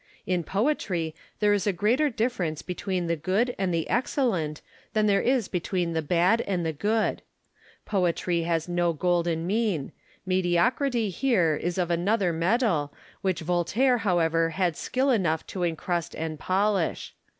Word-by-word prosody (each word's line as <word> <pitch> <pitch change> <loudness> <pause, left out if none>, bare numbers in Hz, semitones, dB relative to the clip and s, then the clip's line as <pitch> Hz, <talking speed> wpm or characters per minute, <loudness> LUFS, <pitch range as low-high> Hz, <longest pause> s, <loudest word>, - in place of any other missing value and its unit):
In 180 -2 0
poetry, 190 - -1 0.3
there 210 0 +4
is 205 -1 0
a - - +4
greater 230 - +2
difi'erence 220 - -2
between 180 0 -2
the 170 0 0
good 200 +10 0
and 190 -2 0
the 165 -2 -1
excellent 210 - 0 0.3
than 215 -1 +2
there 200 -1 +3
is 250 -5 +1
between 175 -1 -2
the 160 - 0
bad 180 +8 +2
and 180 -4 -1
the 160 - -1
good. 215 +8 0 0.6
Poetry 175 -3 0
has 165 -1 -1
no 175 -1 +1
golden 170 0 0
mean; 200 -7 0 0.3
mediocrity 195 +6 +1
here 180 - +2
is 175 +4 -3
of 175 -2 0
another 180 +1 +1
metal, 170 - +1 0.3
which 190 -3 -1
Voltaire 180 - +2
however 165 -5 +2
had 175 0 0
skill 265 - 0
enough 170 -9 +1
to 185 - -6
encrust 170 0 -2
and 155 -1 -4
polish. 195 -1 0
180 Hz, 150 wpm, -26 LUFS, 170-215 Hz, 0.6 s, there